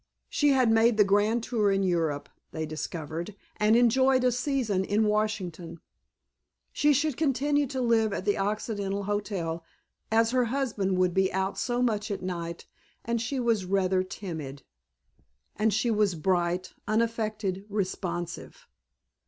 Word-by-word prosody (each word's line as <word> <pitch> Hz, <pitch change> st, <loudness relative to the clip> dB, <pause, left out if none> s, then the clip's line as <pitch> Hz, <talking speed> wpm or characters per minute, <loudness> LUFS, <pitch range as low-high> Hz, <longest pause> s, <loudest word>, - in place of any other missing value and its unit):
She 295 Hz, -, +2 dB
had 260 Hz, -4 st, +4 dB
made 225 Hz, 0 st, +4 dB
the 210 Hz, -, +7 dB
grand 205 Hz, +4 st, +2 dB
tour 215 Hz, -5 st, +1 dB
in 195 Hz, 0 st, +1 dB
Europe, 160 Hz, -6 st, 0 dB, 0.2 s
they 160 Hz, -, -3 dB
discovered, 155 Hz, +4 st, -5 dB, 0.2 s
and 210 Hz, +1 st, +4 dB
enjoyed 255 Hz, +2 st, +4 dB
a 250 Hz, -, +4 dB
season 245 Hz, -6 st, 0 dB
in 210 Hz, +3 st, +1 dB
Washington. 190 Hz, -6 st, -2 dB, 0.9 s
She 295 Hz, -, +3 dB
should 290 Hz, 0 st, +1 dB
continue 290 Hz, 0 st, +1 dB
to 260 Hz, +1 st, -4 dB
live 230 Hz, -3 st, +2 dB
at 190 Hz, -, -4 dB
the 205 Hz, -, +2 dB
Occidental 200 Hz, -1 st, -2 dB
Hotel 195 Hz, -5 st, -3 dB, 0.5 s
as 225 Hz, +1 st, +3 dB
her 250 Hz, -1 st, +2 dB
husband 225 Hz, -7 st, -1 dB
would 180 Hz, -1 st, +2 dB
be 190 Hz, 0 st, +2 dB
out 190 Hz, +1 st, -1 dB
so 245 Hz, 0 st, 0 dB
much 215 Hz, -2 st, 0 dB
at 200 Hz, -2 st, -4 dB
night 170 Hz, -2 st, -5 dB, 0.4 s
and 235 Hz, -1 st, -1 dB
she 260 Hz, +4 st, -2 dB
was 230 Hz, -6 st, +1 dB
rather 190 Hz, 0 st, +1 dB
timid. 160 Hz, -8 st, -7 dB, 0.9 s
And 215 Hz, +1 st, +2 dB
she 220 Hz, +4 st, +1 dB
was 210 Hz, -4 st, +2 dB
bright, 175 Hz, +2 st, 0 dB
unaffected, 215 Hz, -3 st, -1 dB
responsive. 180 Hz, -4 st, -4 dB
210 Hz, 145 wpm, -28 LUFS, 185-230 Hz, 0.9 s, the